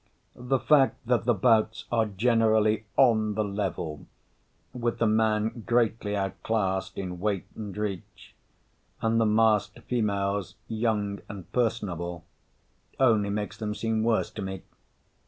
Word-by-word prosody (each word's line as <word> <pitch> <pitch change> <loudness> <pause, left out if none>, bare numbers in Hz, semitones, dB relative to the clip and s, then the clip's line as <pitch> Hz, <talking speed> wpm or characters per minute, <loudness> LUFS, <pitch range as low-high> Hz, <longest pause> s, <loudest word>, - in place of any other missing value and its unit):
The 125 +2 0
fact 135 -2 +3
that 120 -1 +1
the 120 - +4
bouts 110 +1 +2
are 115 -2 +2
generally 110 0 +2
"on 110 -5 +4
the 110 - +1
level," 95 -6 -4 0.7
with 120 -2 -2
the 115 - +1
man 110 +1 +1
greatly 115 -3 +1
outclassed 95 -1 -2
in 90 -2 -5
weight 100 -1 -1
and 105 -3 -7
reach 100 -4 -5 0.7
and 115 0 +2
the 110 - +3
masked 110 -1 +2
females 100 -5 -1
young 110 -3 -1
and 95 -5 -9
personable, 90 -8 -2 0.7
only 110 -6 +4
makes 105 +1 -3
them 105 -1 -3
seem 110 +1 -1
worse 115 0 +1
to 110 - -7
me. 95 -1 -5
110 Hz, 130 wpm, -27 LUFS, 100-115 Hz, 0.7 s, the